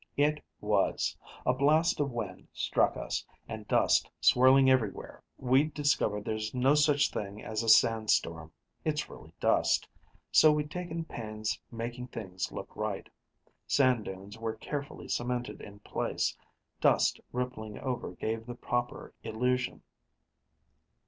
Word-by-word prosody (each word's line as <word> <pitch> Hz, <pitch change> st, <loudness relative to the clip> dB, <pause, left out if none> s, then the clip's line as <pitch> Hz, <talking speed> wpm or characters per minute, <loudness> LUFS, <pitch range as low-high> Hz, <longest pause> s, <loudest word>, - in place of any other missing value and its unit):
It 150 Hz, +1 st, +2 dB, 0.2 s
was! 105 Hz, -2 st, +1 dB, 0.3 s
A 125 Hz, -, +4 dB
blast 155 Hz, +6 st, +3 dB
of 145 Hz, -1 st, +1 dB
wind 110 Hz, -6 st, -5 dB
struck -, -, +1 dB
us, -, -, -3 dB, 0.2 s
and -, -, -7 dB
dust, -, -, +3 dB
swirling 130 Hz, +2 st, +6 dB
everywhere. 130 Hz, -7 st, +1 dB, 0.2 s
We'd 135 Hz, +4 st, +2 dB
discovered 110 Hz, -8 st, +1 dB
there's 110 Hz, +1 st, -3 dB
no 130 Hz, +3 st, +4 dB
such 150 Hz, -1 st, +3 dB
thing 100 Hz, 0 st, -5 dB
as 110 Hz, 0 st, -2 dB
a 115 Hz, -, -1 dB
sand 115 Hz, -1 st, +5 dB
storm 80 Hz, -1 st, +1 dB, 0.3 s
it's 150 Hz, -1 st, -1 dB
really -, -, -12 dB
dust -, -, +2 dB, 0.4 s
so 155 Hz, -, +7 dB
we'd 150 Hz, 0 st, -1 dB
taken 170 Hz, -1 st, -4 dB
pains 110 Hz, -4 st, -4 dB
making 120 Hz, +2 st, -5 dB
things 95 Hz, -7 st, -5 dB
look -, -, -8 dB
right. -, -, -3 dB, 0.6 s
Sand 130 Hz, -5 st, +3 dB
dunes 100 Hz, +3 st, -8 dB
were 115 Hz, -1 st, -3 dB
carefully 140 Hz, +5 st, -6 dB
cemented 120 Hz, 0 st, -2 dB
in 100 Hz, 0 st, -10 dB
place; -, -, -1 dB, 0.4 s
dust -, -, +3 dB
rippling 125 Hz, -4 st, -4 dB
over 125 Hz, -8 st, -3 dB
gave 110 Hz, +4 st, -3 dB
the 120 Hz, -, -6 dB
proper 120 Hz, 0 st, -3 dB
illusion. 125 Hz, +3 st, -1 dB
120 Hz, 135 wpm, -30 LUFS, 110-140 Hz, 0.6 s, so